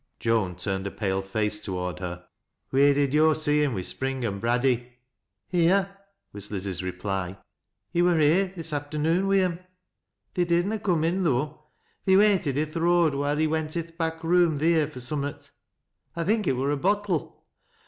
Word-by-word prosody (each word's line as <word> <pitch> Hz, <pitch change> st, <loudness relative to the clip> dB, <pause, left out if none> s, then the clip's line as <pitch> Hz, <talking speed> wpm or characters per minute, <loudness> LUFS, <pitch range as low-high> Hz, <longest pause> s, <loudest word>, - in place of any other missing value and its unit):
Joan 110 Hz, -6 st, 0 dB
turned 95 Hz, +1 st, -3 dB
a -, -, -2 dB
pale 95 Hz, -2 st, -2 dB
face 105 Hz, +2 st, -1 dB
toward 90 Hz, -3 st, -4 dB
her. 90 Hz, -1 st, -6 dB, 0.2 s
" -, -, -54 dB
Wheer 140 Hz, +1 st, +4 dB
did 140 Hz, -1 st, +1 dB
yo' 155 Hz, +1 st, +5 dB
see 150 Hz, -1 st, +1 dB
liim 140 Hz, -5 st, +1 dB
wi' 95 Hz, -, -2 dB
Spring 135 Hz, +4 st, -2 dB
an' 100 Hz, -3 st, -3 dB
Braddy? 125 Hz, +1 st, 0 dB, 0.2 s
" 100 Hz, -5 st, -57 dB
" 95 Hz, -, -56 dB
Here," 190 Hz, +3 st, +2 dB, 0.4 s
was 100 Hz, 0 st, -9 dB
Liz's 95 Hz, -3 st, -3 dB
reply. 95 Hz, 0 st, -4 dB, 0.3 s
" -, -, -56 dB
He 175 Hz, -, +2 dB
wur 175 Hz, -1 st, +3 dB
here 160 Hz, +6 st, +4 dB
this 165 Hz, -2 st, -5 dB
afternoon 155 Hz, +6 st, 0 dB
wi' 195 Hz, 0 st, +4 dB
em. 175 Hz, -2 st, -1 dB, 0.7 s
They 180 Hz, -, +1 dB
did 170 Hz, +1 st, +2 dB
na 215 Hz, +2 st, -2 dB
coom 180 Hz, -6 st, +1 dB
in, 180 Hz, +4 st, +1 dB
though, 150 Hz, 0 st, -1 dB, 0.2 s
— -, -, -41 dB
they 190 Hz, -1 st, +5 dB
waited 195 Hz, -9 st, +3 dB
i' 150 Hz, -, +2 dB
th' 155 Hz, +2 st, -8 dB
road, 170 Hz, -2 st, +3 dB
wluLt 145 Hz, +1 st, -1 dB
he 155 Hz, -, +2 dB
went 155 Hz, +1 st, -1 dB
i' -, -, +1 dB
th' 165 Hz, 0 st, -20 dB
back 165 Hz, -1 st, -3 dB
room 170 Hz, -2 st, +3 dB
theer 160 Hz, 0 st, +2 dB
fur 140 Hz, -4 st, -10 dB
summal. 140 Hz, +2 st, -4 dB, 0.7 s
1 170 Hz, -1 st, -2 dB
thinlj 210 Hz, 0 st, +1 dB
it -, -, +3 dB
wur 135 Hz, +3 st, 0 dB
a 145 Hz, -, 0 dB
bottle. 195 Hz, 0 st, -1 dB
150 Hz, 200 wpm, -26 LUFS, 115-170 Hz, 0.7 s, yo